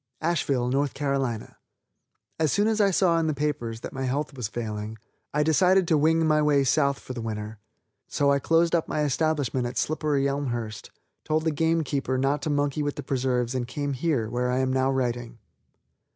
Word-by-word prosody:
ASHEVILLE, 135 -6 0 0.5
N. 115 -3 -5
C. - - -23 0.9
As 155 -3 +2
soon 205 +1 +2
as 220 -1 +2
I 200 - +4
saw 175 -3 +3
in 160 - 0
the 155 - 0
papers 125 -6 -2
that - - -7
my 135 0 -3
health 135 +1 -2
was 125 -5 -3
failing, 110 -1 -5 0.3
I 150 +1 +1
decided 180 +4 +4
to 160 - +3
wing 160 +2 +3
my 155 -1 +3
way 145 -2 +3
South 140 +1 +2
for 130 - -8
the 120 - -5
winter. 110 -1 -5 0.5
So 140 0 +2
I 140 - +3
closed 165 +3 +2
up 170 -2 +1
my 150 - -1
establishment 145 -3 0
at 120 - -6
Slipperyelmhurst, 140 -7 -1 0.3
told 155 0 0
the 160 - +1
game 160 +2 +1
keeper 135 -3 -1
not 135 +2 +1
to 155 - -2
monkey 145 0 0
with 145 -1 -2
the - - -6
preserves 125 -2 0
and 125 -2 -2
came 145 +2 -3
here, 130 -5 0
where 125 +2 -1
I 125 - +1
am 130 0 +1
now 130 0 +2
writing. 120 -2 -2
140 Hz, 195 wpm, -26 LUFS, 125-155 Hz, 0.9 s, I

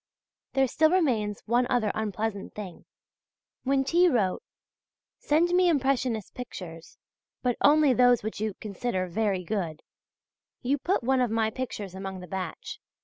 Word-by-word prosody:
There 270 -1 +3
still 315 +5 +3
remains 240 - +1
one 240 +2 +2
other 220 -4 +1
unpleasant 215 -1 -3
thing. 195 -5 -8 0.8
When 270 0 +1
T. 345 +6 +4
wrote: 205 - +1 0.8
"Send 320 +4 +2
me 360 0 +4
impressionist 260 - 0
pictures, 175 -9 -9 0.5
but 245 -2 +1
only 295 -2 +5
those 245 -2 +4
which 215 -1 -4
you 215 -3 -2
consider 200 -2 -3
very 195 0 -1
good" 175 -5 -3 0.8
you 275 +3 +1
put 360 -1 0
one 260 +1 +2
of 245 - +2
my 220 0 +1
pictures 215 -6 -5
among 190 0 -6
the 180 - -9
batch. 185 -1 -5
225 Hz, 145 wpm, -27 LUFS, 200-265 Hz, 0.8 s, only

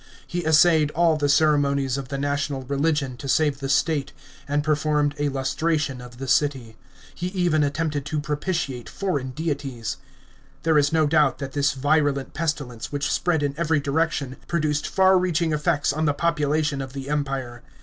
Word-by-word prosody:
He 175 0 -3
essayed 160 -1 +5
all 165 -1 +4
the 145 -1 0
ceremonies 140 -3 +2
of 135 -2 -5
the 140 - -4
national 145 -1 -2
religion 140 -1 -1
to 140 - -7
save 145 +1 +2
the 135 -1 -4
state, 140 -1 +1 0.3
and 145 +1 0
performed 150 -1 +1
a 145 0 +1
lustration 140 0 -1
of 125 -1 -12
the 135 +1 -6
city. 130 -5 +1 0.4
He 175 - -4
even 175 -5 +1
attempted 145 0 -1
to 155 0 -1
propitiate 145 -3 -3
foreign 145 -10 -2
deities. 135 -5 -4 0.7
There 160 -2 +4
is 145 0 +2
no 160 -1 +3
doubt 150 -2 +3
that 140 -2 -6
this 140 0 +1
virulent 145 0 +1
pestilence, 145 -8 -3
which 145 0 -1
spread 165 -4 +1
in 140 -1 0
every 160 -2 +1
direction, 145 -2 -1
produced 155 -3 0
far 190 -1 +4
reaching 170 -3 0
effects 150 -1 +1
on 155 +1 -1
the 145 -1 +1
population 150 -3 0
of 135 -1 -7
the 135 -1 -6
Empire. 135 -5 -3
145 Hz, 170 wpm, -24 LUFS, 135-155 Hz, 0.7 s, essayed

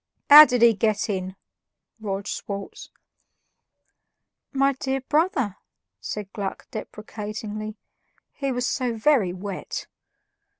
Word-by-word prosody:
"How 300 +1 +13
did 245 -4 +1
he 235 -1 +7
get 215 +1 0
in?" 185 -1 -4 0.6
roared 200 -2 -4
Schwartz. 200 -1 -6 1.6
"My 275 0 +2
dear 265 0 -3
brother," 270 - 0 0.4
said 205 -2 -6
Gluck 200 -2 -5
deprecatingly, 215 0 -6 0.6
"he 275 -2 -3
was 250 -1 -1
so 250 -3 -1
VERY 225 -5 +2
wet!" 185 +1 -6
215 Hz, 100 wpm, -24 LUFS, 200-265 Hz, 1.6 s, How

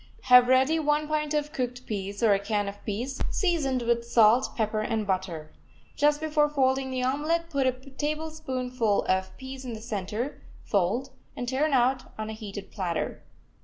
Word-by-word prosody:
Have 250 -1 +7
ready 260 +5 +4
one 300 0 +1
pint 305 0 -1
of 295 0 -1
cooked 250 0 -3
peas, 200 0 -4
or 215 -3 +6
a 195 - +2
can 205 0 -1
of 200 +1 -7
peas, 245 +6 -3
seasoned 290 -9 0
with 235 0 +1
salt, 235 +1 +4
pepper 215 -1 0
and 220 0 -1
butter. 185 -5 -3 0.4
Just 295 0 +3
before 305 -1 +2
folding 265 -2 +1
the 255 -1 -2
omelet 315 +6 0
put 275 -3 +1
a - - +4
tablespoonful 265 -4 -2
of 190 0 -1
peas 265 0 -8
in 250 -2 -5
the 220 - -6
center, 220 +3 -4 0.2
fold, 215 +7 0 0.2
and 245 - -4
turn 280 +5 +1
out 255 0 +1
on 215 0 -4
a - - -5
heated 205 -2 -8
platter. 180 -5 -3
255 Hz, 170 wpm, -27 LUFS, 215-285 Hz, 0.4 s, Have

